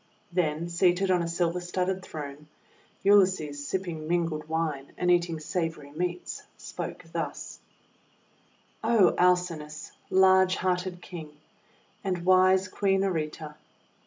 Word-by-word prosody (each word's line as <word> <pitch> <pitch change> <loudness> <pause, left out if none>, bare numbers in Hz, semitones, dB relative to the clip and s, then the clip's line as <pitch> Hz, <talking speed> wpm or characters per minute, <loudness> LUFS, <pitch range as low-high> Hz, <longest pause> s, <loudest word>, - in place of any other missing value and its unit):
Then, 170 -2 0
seated 180 +2 +2
on 180 -1 +3
a 170 - -2
silver 170 +1 0
studded 185 +1 -2
throne, 150 -3 -8 0.6
Ulysses, 185 -8 +3
sipping 170 -4 -3
mingled 165 -2 -1
wine 155 -4 -2
and 180 0 +2
eating 170 -2 +2
savory 160 -3 -3
meats, 175 +3 -3 0.2
spoke - - -6
thus: - - -4 1.2
O 225 -4 +4
Alcinous, 175 -4 0 0.2
large 190 0 +5
hearted 180 0 -2
King, 165 -4 -8 0.7
and 180 -3 -2
wise 185 0 +5
Queen 195 0 +1
Areta! 155 -4 -3
175 Hz, 110 wpm, -28 LUFS, 160-185 Hz, 1.2 s, large